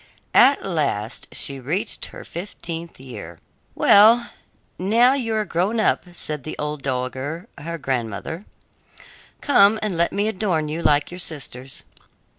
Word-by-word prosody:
At 275 +3 +6
last 140 - -2
she 140 -1 -3
reached 180 - -2
her - - -10
fifteenth 170 -3 -7
year. 105 -11 -9 0.4
"Well, 225 +4 +6 0.5
now 230 +7 +4
you 235 -5 -1
are 215 -1 0
grown 195 +6 0
up," 215 - +2
said 150 -5 -5
the 155 - -6
old 150 -1 -4
dowager, 135 - -3
her 170 +3 -5
grandmother. 130 - -3 1.0
"Come, 220 -7 +5
and 210 -4 -1
let 170 +1 +2
me 205 +1 0
adorn 185 -7 -1
you 160 +2 -3
like 145 -1 +2
your 180 - -7
sisters." 135 -6 -7
170 Hz, 135 wpm, -22 LUFS, 140-205 Hz, 1.0 s, At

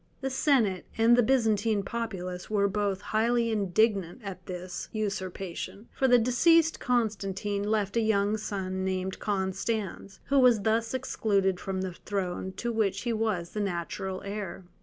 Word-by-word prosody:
The 270 0 -2
senate 245 -9 +2
and 230 +1 +6
the 245 - +5
Byzantine 220 -4 +2
populace 190 -6 -4
were 205 -2 +2
both 200 -1 -1
highly 230 +2 +1
indignant 205 0 +1
at 185 -2 -8
this 180 0 -6
usurpation, 195 -1 -4
for 265 - +2
the 245 -1 +7
deceased 325 +8 +4
Constantine 205 -4 -1
left 205 -1 0
a 230 - +3
young 210 -1 +2
son 190 -3 -3
named 190 0 -2
Constans, 195 0 -2
who 280 0 +4
was 245 -5 +5
thus 225 +3 +1
excluded 200 -7 0
from 190 -1 -3
the 185 -1 -3
throne 190 -1 -3
to 235 +5 -3
which 200 -3 0
he 240 -2 -1
was 215 -6 -1
the 215 - -4
natural 185 0 -3
heir. 200 -3 -5
205 Hz, 150 wpm, -28 LUFS, 190-225 Hz, -, the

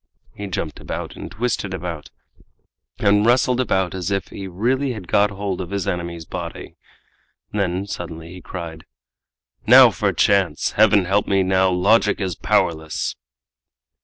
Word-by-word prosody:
He 105 - -6
jumped 85 -4 -4
about, - - -6
and - - -8
twisted 105 -4 -2
about, 85 -4 -6 0.9
and 105 +1 +3
wrestled 125 +2 +3
about 95 -7 0
as 95 -1 -3
if 100 -1 -2
he 95 - -7
really 125 +9 0
had 100 -6 -9
got 105 +3 +3
hold 100 -2 -4
of 90 - -6
his 100 -2 -3
enemy's 85 -1 -3
body. 85 -1 -7 0.8
Then 95 -2 -1
suddenly 85 -4 -7
he 90 - -10
cried, 85 -4 -8 0.8
"Now - - +9
for - - 0
chance! 100 -3 +2
Heaven 105 -3 +4
help 100 +3 +1
me 100 -1 +2
now, 95 0 +3
logic 105 +4 +3
is 95 -3 -2
powerless!" 80 -1 0
95 Hz, 145 wpm, -21 LUFS, 90-105 Hz, 0.9 s, Now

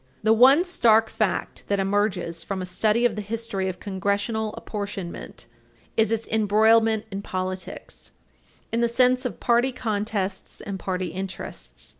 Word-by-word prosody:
The 220 +1 +5
one 265 +8 +7
stark 225 -11 +3
fact - - -2
that 200 -1 0
emerges 190 -4 0
from 195 -1 -4
a 185 - -3
study 215 +6 +1
of 240 - +2
the 210 - -3
history 210 -2 -3
of 180 - -6
Congressional 205 +3 -1
apportionment 200 -4 -6 0.5
is 220 -1 +3
its 225 0 -1
embroilment 220 +1 +3
in 195 +1 -4
politics, 185 -1 -6 0.6
in 230 - 0
the 235 - +4
sense 250 +2 +3
of 250 - -4
party 240 +2 +2
contests 210 -5 -3
and 195 -1 -6
party 185 -1 -2
interests. 165 - -7
210 Hz, 145 wpm, -25 LUFS, 190-225 Hz, 0.6 s, one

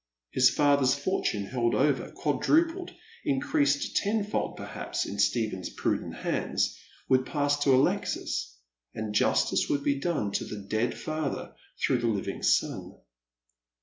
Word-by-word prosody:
His 130 -1 +5
father's 140 -3 +3
fortune 140 - -1
held 120 +1 0
over, 135 -2 +1
quadrupled, 330 - +1 0.3
increased 140 +1 +1
tenfold 210 0 -1
perliaps - - -4
in 100 - -6
Stephen's 100 -2 0
prudent - - -2
hands, - - -1 0.3
would 130 0 +4
pass 145 +1 0
to 140 -2 +4
Alexis, - - 0 0.4
and 110 -1 -4
justice 105 - +2
would 140 -1 0
be 140 -1 +1
done 140 - -1
to - - -1
the 105 - -6
dead 110 +3 0
father 155 -2 -3 0.3
through 125 - +2
the 120 - 0
living 105 -4 -2
son. - - +1
135 Hz, 130 wpm, -28 LUFS, 110-145 Hz, 0.4 s, His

